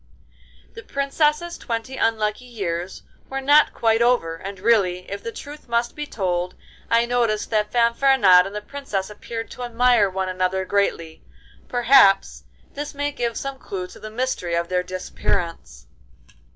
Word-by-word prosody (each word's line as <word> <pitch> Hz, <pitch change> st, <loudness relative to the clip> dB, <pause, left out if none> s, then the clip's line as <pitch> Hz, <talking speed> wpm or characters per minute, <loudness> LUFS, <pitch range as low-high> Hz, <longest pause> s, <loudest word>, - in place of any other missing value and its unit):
The 460 Hz, -, -9 dB
Princess's 300 Hz, +2 st, 0 dB
twenty 230 Hz, +2 st, -4 dB
unlucky 220 Hz, 0 st, 0 dB
years 185 Hz, -6 st, -4 dB, 0.3 s
were 270 Hz, -, -3 dB
not 290 Hz, +3 st, +5 dB
quite 225 Hz, 0 st, +1 dB
over, 235 Hz, -9 st, +2 dB
and 195 Hz, +3 st, -8 dB
really, 190 Hz, -4 st, +2 dB
if 200 Hz, 0 st, -4 dB
the 230 Hz, -, -5 dB
truth 295 Hz, +4 st, -10 dB
must 235 Hz, 0 st, 0 dB
be 295 Hz, 0 st, -5 dB
told, 180 Hz, -5 st, -2 dB, 0.3 s
I 230 Hz, +1 st, +4 dB
noticed 235 Hz, -3 st, 0 dB
that 210 Hz, -1 st, +1 dB
Fanfaronade 235 Hz, -6 st, +5 dB
and 200 Hz, -, -9 dB
the 210 Hz, -, -3 dB
Princess 215 Hz, -9 st, -4 dB
appeared 225 Hz, +2 st, -7 dB
to -, -, -9 dB
admire 240 Hz, -3 st, +3 dB
one 190 Hz, 0 st, -2 dB
another 185 Hz, +1 st, -1 dB
greatly. 170 Hz, -5 st, -1 dB, 0.5 s
Perhaps 245 Hz, -5 st, +4 dB, 0.3 s
this 290 Hz, 0 st, -6 dB
may 290 Hz, +1 st, -1 dB
give 240 Hz, -5 st, -3 dB
some 275 Hz, -1 st, -5 dB
clue 185 Hz, -2 st, -5 dB
to -, -, -13 dB
the 215 Hz, -, -8 dB
mystery 220 Hz, -7 st, -2 dB
of 170 Hz, 0 st, -1 dB
their 180 Hz, 0 st, +1 dB
disappearance. 180 Hz, -2 st, -4 dB
225 Hz, 150 wpm, -22 LUFS, 190-255 Hz, 0.5 s, not